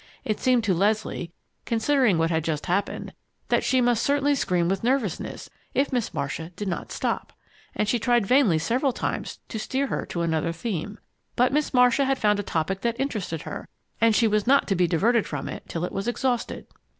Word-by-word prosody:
It 215 - -1
seemed 250 -2 +3
to 200 -4 +2
Leslie, 200 -2 0 0.3
considering 230 - +2
what 165 +1 +1
had 160 -1 +1
just 155 -2 -2
happened, 190 +3 -2 0.4
that - - +2
she 260 -1 +3
must 240 -2 +2
certainly 285 +1 +2
scream 180 -10 +1
with 190 +2 -1
nervousness 240 -7 -1 0.3
if 275 0 +1
Miss 245 -4 0
Marcia 160 +1 -4
did 205 - -4
not 175 - -4
stop, - - -2 0.4
and 210 - 0
she 235 +3 +1
tried 240 -2 +2
vainly 240 - +4
several 245 - +1
times - - -3
to 220 - -4
steer 265 +5 -1
her - - -3
to 170 - -2
another 165 0 0
theme. 205 +1 -4 0.4
But 250 +2 +3
Miss 300 0 +1
Marcia 250 +1 +4
had 270 0 +1
found 210 -3 +2
a - - +1
topic 190 0 -2
that 235 0 -1
interested 210 - -3
her, - - -7 0.3
and 225 -1 +5
she 230 - +4
was 215 0 +1
not 275 +2 +4
to 195 - +2
be 180 -1 +3
diverted 220 +7 +2
from 145 -3 -4
it - - -8
till 170 +1 -2
it - - -6
was 195 +3 -3
exhausted! 245 0 -1
215 Hz, 200 wpm, -25 LUFS, 175-250 Hz, 0.4 s, and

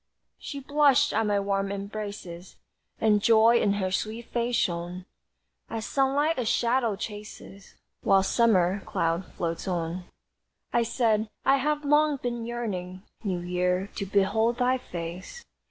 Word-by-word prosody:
She 280 - -6
blushed 285 0 +3
at 220 0 +1
my 205 -1 +2
warm 195 0 -1
embraces 200 -3 -6 0.4
And 210 -2 +3
joy 230 +2 +5
in 200 - +2
her 190 -2 -1
sweet 220 +4 -3
face 240 0 0
shone, 175 0 -2 0.6
As 225 -1 -4
sunlight 280 +2 +1
a 245 - -1
shadow 235 -1 +1
chases 205 -1 -9 0.3
While 195 0 +4
a - - -2
summer 195 -3 +3
cloud 165 +2 -1
floats 170 +1 -3
on. 175 0 -2 0.7
I 235 - +4
said: 225 -2 +1 0.2
"I 270 +1 +5
have 295 +2 -1
long 295 0 +3
been 240 -2 -4
yearning, 190 -6 -4 0.2
New 185 -4 -2
Year, 180 +2 -1
to 200 - -3
behold 205 +4 +2
thy 255 +1 +2
face." 180 - -7
210 Hz, 140 wpm, -27 LUFS, 185-240 Hz, 0.7 s, joy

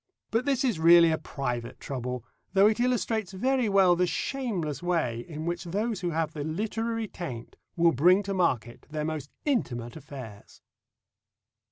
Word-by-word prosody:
But 225 +3 +1
this 275 -2 +1
is 235 -11 +1
really 170 0 +7
a 160 - +1
private 125 -2 -4
trouble, 125 -2 -4 0.3
though 195 +1 +6
it 215 +2 +3
illustrates 225 -5 0
very 255 +3 +1
well 190 -3 +5
the 180 +1 +2
shameless 175 - -2
way 165 -10 0
in 155 -1 -6
which 175 +1 -3
those 205 +3 -2
who 175 - -1
have 160 -1 -1
the 150 - -4
literary 220 +7 -2
taint 130 - -7 0.2
will 170 0 +4
bring 180 +9 +4
to 200 0 -3
market 125 -11 -1
their 150 0 -3
most 155 -2 -4 0.2
intimate 120 - -1
affairs. 130 -9 -11
170 Hz, 160 wpm, -28 LUFS, 145-210 Hz, 0.3 s, really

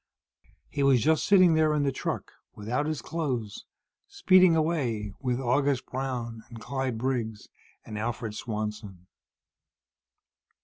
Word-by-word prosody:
He 145 - -4
was 135 -2 +5
just 160 +1 +2
sitting 185 -4 +6
there, 155 -1 +3
in 145 - +1
the 140 - +1
truck, - - -4 0.2
without 125 +8 -2
his 155 -2 -3
clothes, 130 -11 -3 0.4
speeding 185 -2 +5
away 130 - -1
with 125 -2 -1
August 135 +1 +1
Brown 125 -4 -4
and 115 -1 -10
Clyde 130 +1 -3
Briggs 115 -3 -3 0.4
and 105 -1 -6
Alfred 115 -1 -3
Swanson. 105 -4 -5
130 Hz, 125 wpm, -27 LUFS, 110-150 Hz, 0.4 s, sitting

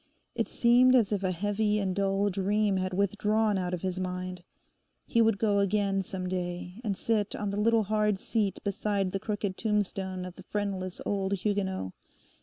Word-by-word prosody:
It - - -1
seemed 250 +2 +5
as 230 -5 +3
if 205 -2 0
a 190 - 0
heavy 205 +3 0
and 190 -3 -1
dull 200 0 +1
dream 200 +1 +1
had 185 0 -1
withdrawn 210 +2 +1
out 180 -1 -2
of 180 -1 -4
his 185 -1 -2
mind. 180 -1 -4 0.6
He 230 - +2
would 225 -2 +3
go 205 -1 +2
again 200 -1 +1
some 185 -1 -5
day, 180 +2 -4
and 200 -4 -1
sit 215 -3 0
on 205 -1 -2
the 205 +1 -1
little 230 0 +4
hard 210 0 +1
seat 200 -1 -1
beside 200 -1 -1
the 195 - -2
crooked 205 -2 -3
tombstone 195 -4 -1
of 180 -1 -9
the - - -10
friendless 195 -3 -3
old 195 -1 0
Huguenot. 190 - -1
200 Hz, 180 wpm, -29 LUFS, 185-210 Hz, 0.6 s, seemed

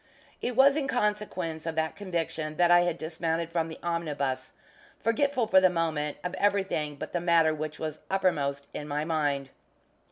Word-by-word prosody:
It 245 - -2
was 275 +2 +6
in 285 -3 0
consequence 205 -8 -1
of 165 - -2
that 160 0 -1
conviction 165 -5 -3
that 175 -1 +4
I 175 - +8
had 175 -1 +1
dismounted 165 +1 -2
from 165 -1 0
the 160 - -8
omnibus, 145 -6 -2 0.5
forgetful, 255 +2 +1
for 190 -3 +5
the 185 - +6
moment, 160 -4 -1
of 180 - -3
everything 195 -7 +1
but - - -7
the 175 - 0
matter 165 -2 +4
which 155 0 -5
was 155 -1 -5
uppermost 145 -8 0
in 150 - -5
my 150 +1 -1
mind. 145 -4 0
165 Hz, 170 wpm, -28 LUFS, 155-185 Hz, 0.5 s, I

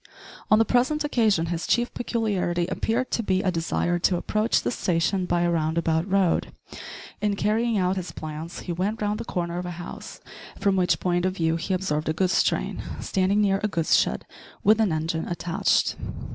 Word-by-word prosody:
On 215 - +6
the 225 - +4
present 255 +7 +2
occasion 220 - +2
his 170 - -4
chief 240 +1 +1
peculiarity 200 -8 -1
appeared 225 +7 -1
to - - +1
be 190 -3 0
a 185 - +2
desire 175 +1 0
to 180 +1 +2
approach 215 +5 +1
the - - 0
station 180 -2 0
by 175 -1 +1
a 175 0 +2
round 160 -1 0
about 165 +2 0
road. 190 -3 +2 0.7
In 210 -1 +1
carrying 220 +3 +1
out 185 0 +1
his 185 -1 -4
plans 155 +2 -7
he 180 - -5
went 190 +6 -1
round 210 0 -1
the - - -5
corner 175 -2 -3
of 180 - -5
a 175 -1 -6
house, 175 - -8 0.4
from 200 -2 +2
which 180 -4 +2
point 175 -1 0
of 185 0 0
view 165 -2 +1
he 185 +3 -1
observed 155 -5 -1
a - - +1
goods 185 +2 +2
train - - -1 0.2
standing 195 +1 +1
near 195 -1 +2
a - - +3
goods 165 -5 +2
shed 65 - +1 0.4
with 215 +2 +5
an 210 -5 +2
engine 160 +1 -2
attached. 175 +2 +1
185 Hz, 195 wpm, -25 LUFS, 170-210 Hz, 0.7 s, On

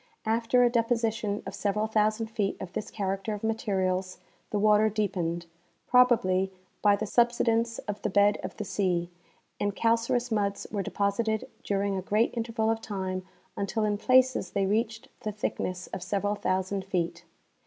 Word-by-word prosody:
After 230 +3 +3
a 240 - +5
deposition 225 -3 0
of - - -6
several 210 +1 0
thousand 215 +1 +1
feet 205 -3 -1
of 175 - -7
this - - -4
character 195 +1 -2
of 205 - -10
materials 190 -4 -1 0.3
the 210 - -1
water 210 +1 +4
deepened, 180 -5 -1 0.4
probably 225 -7 +4 0.3
by 205 -1 +5
the 215 - -3
subsidence 230 0 +2
of 205 0 -4
the - - -1
bed 205 +1 +4
of - - -6
the 210 - -4
sea, 180 -4 0 0.5
and 205 -1 -1
calcareous 230 +2 +1
muds 200 -2 0
were 205 -1 -1
deposited 210 +3 -1 0.2
during 200 0 0
a - - -2
great 210 +5 +1
interval 225 -1 0
of 225 0 -2
time 190 -3 -3 0.3
until 215 +2 -1
in 210 -1 +1
places 255 -4 +4
they 200 -1 0
reached 220 +2 -1
the 215 - -3
thickness 185 -3 -3
of - - -4
several 205 +2 0
thousand 190 -1 -1
feet. 180 -3 -2
210 Hz, 160 wpm, -28 LUFS, 195-225 Hz, 0.5 s, a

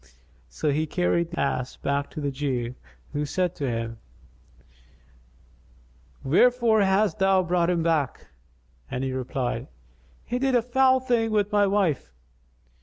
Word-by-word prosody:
So 145 - -1
he 155 +3 0
carried 170 0 0
the 170 - -6
ass 130 -2 -1
back 140 0 -2
to - - -7
the 145 -1 -2
Jew, 130 -3 -2 0.4
who 145 0 -1
said 180 +4 -1
to 140 -3 -2
him, 115 -1 -4 2.2
"Wherefore 230 - +4
hast 195 -2 +2
thou 190 -1 +4
brought 175 0 +1
him 170 -2 +1
back?" 160 -5 0 0.6
and 125 - -3
he 130 -1 -2
replied, 130 -1 -3 0.6
"He 245 - -2
did 265 -1 +1
a 240 - +3
foul 260 +1 +3
thing 240 -3 +1
with 210 -1 +1
my 205 -1 +3
wife." 190 - 0
170 Hz, 140 wpm, -25 LUFS, 140-210 Hz, 2.2 s, Wherefore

